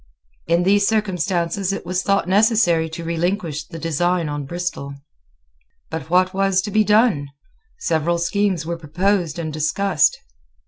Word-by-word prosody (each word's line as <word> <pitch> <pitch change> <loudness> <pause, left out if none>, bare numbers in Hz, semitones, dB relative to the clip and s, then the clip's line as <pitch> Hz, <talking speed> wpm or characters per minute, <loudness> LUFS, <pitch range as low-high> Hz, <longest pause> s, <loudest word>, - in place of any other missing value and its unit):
In 170 +1 +2
these 200 +2 +3
circumstances 190 -3 0
it 195 - -5
was 180 +1 -1
thought 195 -2 +1
necessary 195 -5 +3
to 160 +1 -7
relinquish 165 -2 -2
the 165 - -9
design 165 +1 0
on 145 -1 -4
Bristol. 175 -4 -4 1.0
But 160 0 -5
what 185 +2 +3
was 195 -1 +2
to 205 - -4
be 215 +2 +3
done? 210 - +3 0.5
Several 170 - 0
schemes 180 0 0
were 170 +1 -3
proposed 175 +1 0
and 160 -2 -4
discussed. 155 0 +1
175 Hz, 140 wpm, -21 LUFS, 160-195 Hz, 1.0 s, these